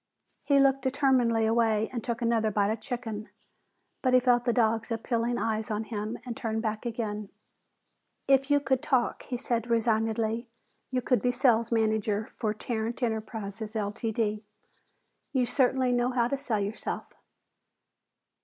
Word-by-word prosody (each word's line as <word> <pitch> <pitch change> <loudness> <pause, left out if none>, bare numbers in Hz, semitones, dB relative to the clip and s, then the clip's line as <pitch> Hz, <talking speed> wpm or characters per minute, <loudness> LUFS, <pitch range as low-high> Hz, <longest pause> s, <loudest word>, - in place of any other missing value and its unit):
He 280 -1 +4
looked 275 0 +4
determinedly 255 -4 +2
away 220 -1 +2
and 235 -3 -3
took 235 0 -3
another 230 -2 +2
bite 205 0 +1
of 220 - -2
chicken, 225 -4 -5 0.7
but 255 -1 +3
he - - +8
felt 245 -1 +3
the 240 - +3
dog's 225 -1 +1
appealing 235 +1 -1
eyes 220 +1 -1
on 215 0 -1
him 215 +1 -4
and 240 -2 -4
turned 220 0 -2
back 215 +1 -2
again. 215 -3 -3 1.0
"If 270 0 +4
you 290 0 +5
could 265 -2 0
talk," 255 -3 +1
he 250 - -3
said 240 -2 -2
resignedly, 225 0 +1 0.4
"you 255 -1 -1
could 250 0 +2
be 250 - +2
sales 245 -2 +3
manager 220 -1 +1
for 215 -3 -1
Tarrant 225 +2 -3
Enterprises, 220 -1 -3
Ltd. 215 0 -1 0.9
You 255 -2 +2
certainly 255 0 +2
know 245 0 +2
how 245 -2 +1
to 275 - -1
sell 250 -6 -1
yourself." 205 +3 -3
230 Hz, 150 wpm, -28 LUFS, 220-250 Hz, 1.0 s, he